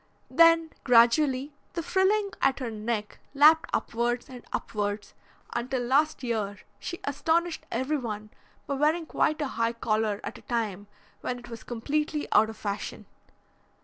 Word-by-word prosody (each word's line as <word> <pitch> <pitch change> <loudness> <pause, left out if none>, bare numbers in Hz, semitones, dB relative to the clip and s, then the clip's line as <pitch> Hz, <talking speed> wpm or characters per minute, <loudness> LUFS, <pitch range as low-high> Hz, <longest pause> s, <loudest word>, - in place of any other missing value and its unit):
Then 330 -1 +5
gradually 255 +3 +4 0.2
the 335 - -3
frilling 395 +4 +2
at 270 -1 +3
her 250 -4 -4
neck 215 0 -3 0.2
lapped 310 +3 +6
upwards 240 +2 -1
and 250 -2 -10
upwards, 205 -1 -3 0.4
until 245 +1 -1
last 285 +4 +2
year 215 -4 -2 0.2
she 345 - -5
astonished 325 +4 0
everyone 235 -7 -2 0.3
by 280 - -2
wearing 305 +4 +2
quite 310 0 +1
a - - -1
high 230 -2 0
collar 215 -2 0
at - - -6
a - - -17
time 210 -4 -2 0.3
when 250 - -3
it 240 -1 -12
was 230 -1 -8
completely 295 +5 -2
out 220 +1 +5
of 220 - -8
fashion. 205 -1 -4
250 Hz, 145 wpm, -28 LUFS, 225-305 Hz, 0.4 s, lapped